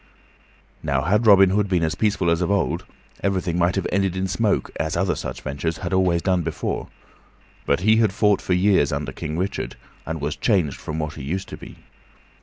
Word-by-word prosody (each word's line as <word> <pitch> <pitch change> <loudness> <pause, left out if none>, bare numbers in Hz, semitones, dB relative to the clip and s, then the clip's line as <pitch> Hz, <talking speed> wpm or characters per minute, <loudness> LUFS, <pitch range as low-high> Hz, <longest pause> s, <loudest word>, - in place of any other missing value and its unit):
Now, 70 -1 0
had 105 +8 +2
Robin 95 -2 +7
Hood 100 0 +1
been 90 -3 +1
as 80 -1 0
peaceful 95 -1 +1
as 85 +1 +1
of 90 - 0
old, 100 -3 0 0.4
everything 90 -3 0
might 85 +1 +2
have 95 - -1
ended 95 -1 +1
in 95 +1 -1
smoke, 105 +2 0
as 80 +1 -1
other - - +1
such - - -6
ventures 80 +4 -3
had 90 -1 -4
always 90 -3 +2
done 90 -2 +2
before; 80 -1 -3 0.8
but 70 +4 +2
he 110 +3 +4
had 110 -3 +3
fought 105 0 +2
for 90 - -1
years 90 -6 +3
under - - -3
King 75 +1 -5
Richard, 95 +3 -3 0.3
and 80 0 -3
was 75 +1 -2
changed 90 - +1
from 75 - -5
what 75 -1 -3
he 75 - -9
used 90 +8 -4
to - - -7
be. - - -11
90 Hz, 205 wpm, -23 LUFS, 80-100 Hz, 0.8 s, Robin